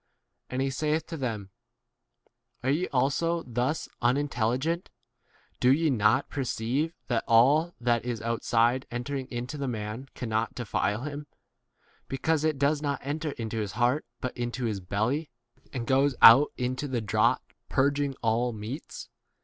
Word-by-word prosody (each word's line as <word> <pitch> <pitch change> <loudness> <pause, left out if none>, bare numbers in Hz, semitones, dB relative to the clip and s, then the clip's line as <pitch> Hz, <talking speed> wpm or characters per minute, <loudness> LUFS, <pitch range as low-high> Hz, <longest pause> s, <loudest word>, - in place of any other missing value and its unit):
And 130 +1 -1
he 135 - 0
saith 155 +3 0
to 165 - -6
them, 110 -9 -4 1.1
Are 130 - +2
ye 170 +6 +1
also 165 +6 +1
thus 125 +6 -1
unintelli 125 -2 +1
gent? 165 +6 -2 0.7
Do 125 - +5
ye 155 +2 +3
not 115 +3 +3
perceive 135 +4 -2
that 120 -3 0
all 145 +9 +4
that 120 -1 +1
is 120 -2 -3
outside 115 +2 +1
entering 130 +2 -4
into 125 +4 -5
19 - - -9
the 140 - -2
man 115 +2 -5
cannot 115 -2 -2
defile 110 -2 -1
him, 145 0 -6 0.8
be 135 - -3
cause 160 +2 +1
it 155 -2 +1
does 145 +2 +2
not 145 -2 -1
enter 150 +2 -3
into 115 -1 -4
his 105 -3 -3
heart 125 +4 +1
but 125 - -3
into 120 +1 -3
his 105 -4 -1
belly, 110 - -1 0.4
and 125 -3 -4
goes 135 +2 +3
out 135 +6 +9
into 130 +3 -2
the 130 -3 -1
draught, 105 - +1 0.2
purging 140 0 +1
all 115 +2 +2
20 110 - -8
meats 120 +9 -7
130 Hz, 155 wpm, -28 LUFS, 115-145 Hz, 1.1 s, out